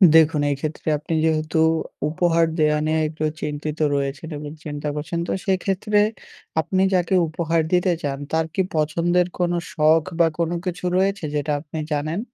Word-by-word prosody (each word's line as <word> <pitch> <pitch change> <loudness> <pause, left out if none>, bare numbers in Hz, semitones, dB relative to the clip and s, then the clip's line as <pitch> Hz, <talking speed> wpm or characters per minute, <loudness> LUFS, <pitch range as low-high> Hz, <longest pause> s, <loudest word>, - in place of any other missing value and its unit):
দেখুন, 160 -2 +5
এই 140 - +1
ক্ষেত্রে 155 +1 -5
আপনি 150 +3 -5
যেহেতু 155 0 0 0.5
উপহার 165 +1 +2
দেয়া 150 0 +3
নেওয়া 160 0 +1
একটু 155 0 -5 0.2
চিন্তিত 150 +1 -4 0.2
রয়েছেন 140 +3 -3
এবং 145 0 -7
চিন্তা 145 0 -4
করছেন 160 +3 -3
তো - - -2
সেই 190 -2 +2
ক্ষেত্রে 205 +2 0 0.6
আপনি 185 +4 +1
যাকে 180 0 +1
উপহার 165 +1 0
দিতে 180 +1 +3
চান 140 -1 -2
তার 160 0 +1
কি 190 - +1
পছন্দের 170 +3 +2
কোন 175 -1 +1 0.2
শখ 155 0 +4 0.2
বা 170 - +6
কোন 170 -1 0 0.2
কিছু 180 0 -4
রয়েছে 195 0 +1
যেটা 150 +1 -1
আপনি 155 +1 -9
জানেন? 155 +4 -1
160 Hz, 165 wpm, -22 LUFS, 150-175 Hz, 0.6 s, বা